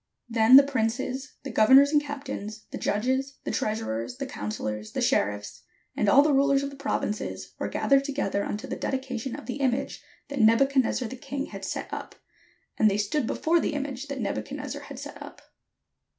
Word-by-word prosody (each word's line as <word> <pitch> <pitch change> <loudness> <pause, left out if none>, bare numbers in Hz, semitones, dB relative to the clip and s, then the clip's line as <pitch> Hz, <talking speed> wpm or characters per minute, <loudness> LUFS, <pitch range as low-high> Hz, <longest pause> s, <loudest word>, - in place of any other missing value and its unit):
Then 230 +1 +6
the 275 - +11
princes, 260 +1 -2
the 275 - -5
governors, 265 +6 +6
and 300 -1 +4
captains, 270 -7 -6
the - - -5
judges, 260 +6 -1
the - - -3
treasurers, 215 - -2
the 275 - -3
counsellors, 110 - -5
the - - -2
sheriffs, 105 +1 0 0.3
and 210 - +2
all 280 +7 +7
the 300 -1 +3
rulers 275 0 +3
of 280 - -3
the - - -10
prov 280 +1 -2
inces, 210 - -4
were - - -1
gathered 275 0 +2
together 270 -8 -1
unto 210 - -4
the - - -4
dedication 260 -2 -3
of 290 - -9
the 250 +1 -4
image 265 -1 -1 0.3
that 280 -1 -4
Nebuchadnezzar 250 +2 +3
the 260 - -7
king 275 +2 -4
had - - -8
set - - -4
up; - - -6 0.6
and 215 - +6
they 200 - 0
stood 220 +5 0
before 335 +2 +2
the 300 - -1
image 280 -1 -4
that 280 -1 -5
Nebuchadnezzar 110 - -4
had - - -10
set - - -9
up. - - -10
260 Hz, 185 wpm, -27 LUFS, 220-275 Hz, 0.6 s, the